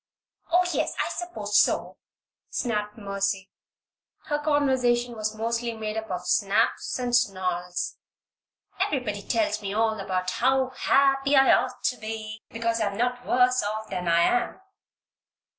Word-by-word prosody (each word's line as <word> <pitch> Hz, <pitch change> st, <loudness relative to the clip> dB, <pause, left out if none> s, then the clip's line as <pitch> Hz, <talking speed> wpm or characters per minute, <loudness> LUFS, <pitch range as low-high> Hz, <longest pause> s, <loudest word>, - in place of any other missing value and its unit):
"Oh, 355 Hz, +1 st, +4 dB
yes! -, -, -1 dB
I -, -, 0 dB
suppose 215 Hz, -13 st, 0 dB
so!" -, -, +1 dB, 0.5 s
snapped 210 Hz, -3 st, -2 dB
Mercy. 200 Hz, -2 st, -2 dB, 0.7 s
Her 295 Hz, -1 st, -1 dB
conversation 260 Hz, -5 st, +1 dB
was 215 Hz, 0 st, -3 dB
mostly 230 Hz, +1 st, -2 dB
made 215 Hz, -1 st, -4 dB
up 220 Hz, -1 st, -4 dB
of 180 Hz, -1 st, -4 dB
snaps 205 Hz, +4 st, +1 dB
and 245 Hz, -1 st, 0 dB
snarls. 185 Hz, -6 st, -1 dB, 0.8 s
"Everybody 225 Hz, -8 st, -1 dB
tells 215 Hz, -1 st, 0 dB
me 200 Hz, 0 st, -4 dB
all 220 Hz, 0 st, +1 dB
about 185 Hz, -1 st, -2 dB
how 260 Hz, +4 st, +2 dB
happy 275 Hz, +1 st, +3 dB
I 270 Hz, 0 st, +6 dB
ought -, -, 0 dB
to 250 Hz, -, +1 dB
be 220 Hz, 0 st, -6 dB
because 230 Hz, 0 st, -1 dB
I'm 200 Hz, -2 st, -1 dB
not 245 Hz, +1 st, -1 dB
worse 250 Hz, +1 st, +3 dB
off 215 Hz, +1 st, -4 dB
than 180 Hz, -1 st, -3 dB
I 170 Hz, 0 st, +4 dB
am. 240 Hz, -, +1 dB
220 Hz, 140 wpm, -26 LUFS, 205-250 Hz, 0.8 s, I